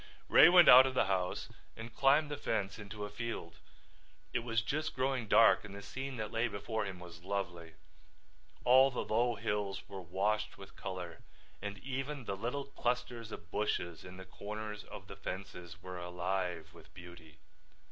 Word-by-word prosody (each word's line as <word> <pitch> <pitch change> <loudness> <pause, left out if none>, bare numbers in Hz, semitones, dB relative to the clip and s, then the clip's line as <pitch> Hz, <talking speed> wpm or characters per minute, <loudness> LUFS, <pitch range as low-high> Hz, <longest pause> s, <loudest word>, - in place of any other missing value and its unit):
Ray - - +9
went 175 -1 +8
out 130 +1 +10
of 130 - -4
the 125 - +3
house 95 -2 -1 0.3
and 115 +1 -8
climbed 145 +4 +3
the - - -1
fence 100 -7 -2
into 105 0 -6
a - - -7
field. 115 +2 -5 0.7
It - - +2
was 115 -1 -1
just 155 +6 -2
growing 130 -3 0
dark 115 +2 +6
and 100 -2 -9
the 100 - -9
scene 130 +2 -5
that 110 -1 -4
lay 115 +2 +1
before 110 +1 -3
him 95 -2 -6
was 85 -1 -11
lovely. 90 -4 -4 0.9
All 130 +2 +7
the 125 - -3
low 120 +2 +1
hills 100 -1 -3
were 95 -1 -7
washed 105 +5 -1
with 95 -1 -12
color 90 -3 -6 0.4
and 100 0 -5
even 135 +4 -4
the 100 - -2
little 125 +7 -3
clusters 120 -4 -3
of 85 - -9
bushes 90 -5 -2
in 90 0 -10
the 95 - -9
corners 105 +2 -6
of 95 - -10
the 100 - -10
fences 90 -3 -7
were 90 -1 -6
alive 90 -2 -3
with 85 - -16
beauty. 85 -3 -13
105 Hz, 175 wpm, -34 LUFS, 90-120 Hz, 0.9 s, out